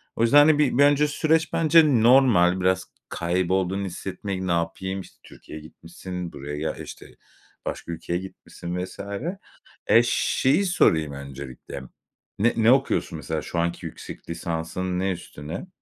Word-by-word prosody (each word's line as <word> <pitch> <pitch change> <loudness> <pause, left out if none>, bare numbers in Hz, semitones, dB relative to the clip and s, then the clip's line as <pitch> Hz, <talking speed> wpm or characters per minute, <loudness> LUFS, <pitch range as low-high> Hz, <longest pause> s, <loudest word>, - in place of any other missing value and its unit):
O - - -3
yüzden 115 +5 +5
hani, 150 0 +6 0.2
bir 140 - +6
önce 145 +1 +4
süreç 160 +2 +1
bence 155 -7 +4
normal. 115 -8 +5
Biraz 95 +1 +1 0.2
kaybolduğunu 95 +2 -1
hissetmek, 95 +1 -5
ne 95 -2 -2
yapayım? 90 +3 -2
İşte, - - -16
Türkiye'ye 75 - -11
gitmişsin, 90 +2 -8
buraya 75 +2 -6
gel 80 +1 -3
işte, - - -9 0.6
başka 85 - -5
ülkeye 85 +1 -3
gitmişsin 90 -2 -7
vs. - - -14 0.9
E, 115 - +6
şeyi 135 +7 +2
sorayım 80 - +2
öncelikle, 70 -1 -8 0.6
ne 115 +4 +3
ne 115 +2 +5
okuyorsun 135 0 +1
mesela? - - -4
Şu 85 - -5
anki 85 0 -1
yüksek - - -10
lisansın 85 +2 -3
ne 95 +1 0
üstüne? 80 - -7
95 Hz, 140 wpm, -24 LUFS, 85-120 Hz, 0.9 s, hani